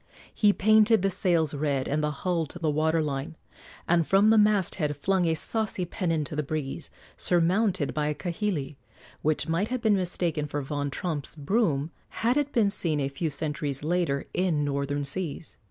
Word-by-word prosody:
He 210 -2 +4
painted 215 0 +4
the 195 - +2
sails 170 -5 +1
red 140 -2 -1
and 150 +2 0
the 150 - +1
hull 165 +2 -1
to 175 - -8
the 160 -3 0
water 160 +2 +1
line, 145 +2 -4 0.5
and 170 -2 +2
from 200 +3 +5
the 225 - +5
masthead 190 -8 +2
flung 185 +4 +1
a 160 - +2
saucy 215 +1 -1
pennon 165 -4 -1
to 150 - -6
the 150 - 0
breeze, 150 +1 -4 0.3
surmounted 180 -1 +2
by 150 -1 0
a 150 - -1
kahili, 170 -5 -3 0.4
which 155 +2 0
might 165 +6 0
have 255 0 -3
been 220 -2 +4
mistaken 175 -5 -1
for 145 0 -3
Von 145 +1 -3
Tromp's 150 -1 -3
broom 155 -2 0 0.3
had 245 +2 +4
it 290 -1 0
been 210 -4 +2
seen 165 -6 0
a 135 -1 -1
few 155 +4 -2
centuries 145 -1 -3
later 165 -4 0
in 170 -5 +1
northern 140 0 -2
seas. 165 +1 -4
165 Hz, 180 wpm, -27 LUFS, 145-190 Hz, 0.5 s, from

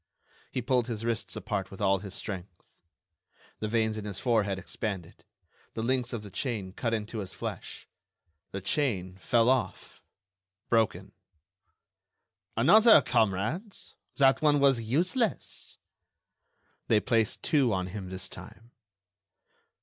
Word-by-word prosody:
He 125 - -2
pulled 125 -2 +1
his 115 -2 -4
wrists 115 -1 -1
apart 100 -2 -3
with 95 - -11
all 100 -1 +3
his 100 0 -7
strength. 90 -4 -7 1.0
The 110 - -2
veins 110 -1 0
in 105 - -7
his 100 -3 -4
forehead 105 -5 +1
expanded. 95 -2 -6 0.5
The 110 - -2
links 125 0 0
of 115 -4 -4
the 100 - -10
chain 105 -5 -3
cut 115 +2 -2
into 110 0 -3
his 95 -3 -6
flesh. - - -6 0.6
The 95 - -5
chain 95 -7 -1
fell 115 +7 +2
off—broken. 95 -4 -2 1.5
"Another, 205 - +7
comrades, 115 - -1 0.2
that 135 -1 +4
one 150 -2 +4
was 135 -4 +4
useless." 180 - -1 1.1
They 110 - +4
placed 110 0 0
two 140 -7 +3
on 95 -2 0
him 95 0 -6
this 90 -1 -5
time. 115 +5 -12
110 Hz, 125 wpm, -29 LUFS, 95-125 Hz, 1.5 s, Another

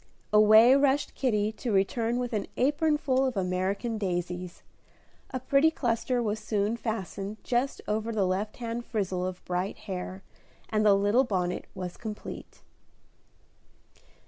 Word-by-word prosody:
Away 215 +3 +8
rushed 280 +1 +2
Kitty 215 -5 +1
to 230 +2 -4
return 225 +4 +1
with 245 -1 -3
an 210 -2 -1
apron 295 +3 +2
full 265 -2 +1
of 260 -5 -1
American 195 +5 -1
daisies. 180 -2 -3 0.7
A 255 - -3
pretty 275 +4 +4
cluster 245 -3 0
was 215 -1 -1
soon 210 0 0
fastened 215 -2 -4
just 250 +3 -1
over 215 +2 -1
the 210 -4 +1
left 190 +3 -2
hand 235 0 -4
frizzle 190 -6 -2
of 185 -1 -7
bright 180 +2 -2
hair, 185 0 -5 0.5
and 215 -1 +1
the 205 -2 +6
little 205 +6 +3
bonnet 180 -7 -2
was 180 -1 -6
complete. 215 -2 -8
215 Hz, 140 wpm, -28 LUFS, 195-245 Hz, 0.7 s, Away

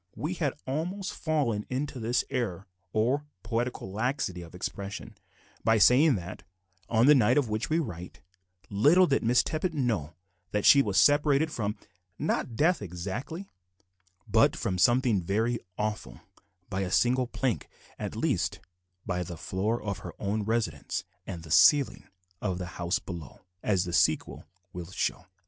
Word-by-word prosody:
We 155 +5 -3
had 155 -7 -1
almost 175 +8 -3
fallen 140 -10 0
into 135 +1 -3
this 120 +2 +1
error 105 -8 -2 0.3
or 130 +8 +1 0.2
poetical 120 -4 -2
laxity 110 -4 -2
of 85 0 -11
expression 100 +2 -6 0.5
by 110 0 +4
saying 130 +6 +6
that, 90 -2 -6 0.5
on 115 +1 +4
the 150 - +8
night 125 -1 +4
of 135 -6 +2
which 110 +1 -2
we 160 - +2
write, 90 - -5 0.5
little 150 - +5
did 140 -5 +1
Miss 120 +2 +3
Tippet 160 +1 -2
know 110 - -1 0.4
that 105 -1 0
she 140 - +8
was 100 -6 +2
separated 145 +1 +4
from, 105 -5 -2 0.4
not 115 - -1
death 160 +4 +2
exactly, 105 - -5 0.8
but - - +4
from 90 -1 -2
something 120 -2 +3
very 110 +7 0 0.2
awful, 105 0 -3 0.5
by 95 0 -2
a 95 - -2
single 125 +5 +2
plank; 120 - -2 0.3
at - - -4
least, - - 0 0.5
by 90 -1 -1
the 85 -1 -6
floor 105 +8 -1
of 100 -2 -3
her 85 - -8
own 105 +2 -1
residence, 100 - -2 0.2
and 85 -4 -6
the 80 - -10
ceiling 145 - +5 0.3
of 95 -4 -1
the 90 - -4 0.2
house 85 +2 +1
below 85 -6 -8 0.2
as 95 -4 +1
the 85 - -5
sequel - - +1 0.3
will 90 -1 -7
show. 95 - -2
110 Hz, 155 wpm, -28 LUFS, 95-140 Hz, 0.8 s, the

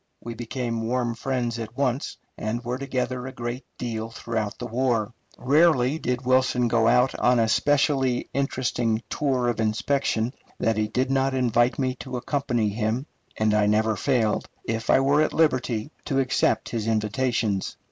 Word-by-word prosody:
We 120 - -7
became 115 -1 -3
warm 120 -1 0
friends 120 -1 -2
at 115 +1 -7
once, 135 0 -1 0.2
and 115 +3 -3
were 125 +1 -2
together 130 -1 -2
a - - -5
great 120 0 -5
deal 115 -2 -4
throughout 115 -2 -3
the 120 - -6
war. 120 -2 0 0.2
Rarely 145 0 +3
did 125 -1 -2
Wilson 130 -1 +3
go 115 -1 +2
out 125 +2 +4
on 125 0 +4
a 115 -1 +3
specially 135 0 +2
interesting 120 -4 0
tour 130 -4 0
of 120 -2 -1
inspection 115 +2 0 0.3
that 115 - +1
he 105 0 +1
did 130 +4 -1
not 135 0 +1
invite 120 -1 +2
me 130 -2 0
to 130 -1 -5
accompany 120 -3 0
him, 110 +5 -1 0.3
and 110 -1 +2
I 105 -1 +3
never 110 +1 +2
failed, 115 -6 0
if 115 0 -3
I - - +6
were 140 +3 +3
at 155 - +1
liberty, 130 -5 +1
to 135 - -1
accept 130 -2 +1
his 115 -2 -3
invitations. 110 -2 0
120 Hz, 165 wpm, -25 LUFS, 115-130 Hz, 0.3 s, I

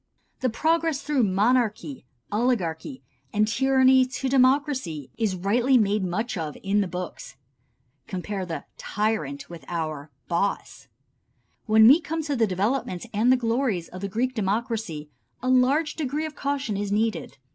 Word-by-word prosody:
The 255 - +1
progress 320 +3 0
through 295 -3 +1
monarchy, 205 - +1 0.2
oligarchy 180 - -1 0.3
and 210 +1 +2
tyranny 260 +2 +4
to 260 +1 -3
democracy 260 - +1
is 215 -4 0
rightly 235 +8 +2
made 210 -2 +2
much 215 +7 -2
of 155 -3 -4
in 200 +2 +2
the 195 - -1
books. 180 -5 -7 0.7
(Compare 190 0 -4
the 165 - -5 0.2
"tyrant" 195 -10 -2
with 170 -2 -10
our 155 -4 -4 0.2
"boss.") 180 +4 -2 0.8
When 220 0 +7
we 290 +8 +7
come 320 0 -3
to 290 -2 -2
the 230 -3 +2
development 205 +1 -1
and 225 +5 +3
the 255 - +5
glories 230 -7 -1
of 185 - -9
the 200 - -3
Greek 250 +6 -1
democracy 210 - -2 0.3
a 255 - 0
large 265 +5 +3
degree 300 +1 -2
of 310 - -6
caution 275 -7 -2
is 200 0 -3
needed. 220 -4 -1
220 Hz, 145 wpm, -25 LUFS, 185-260 Hz, 0.8 s, When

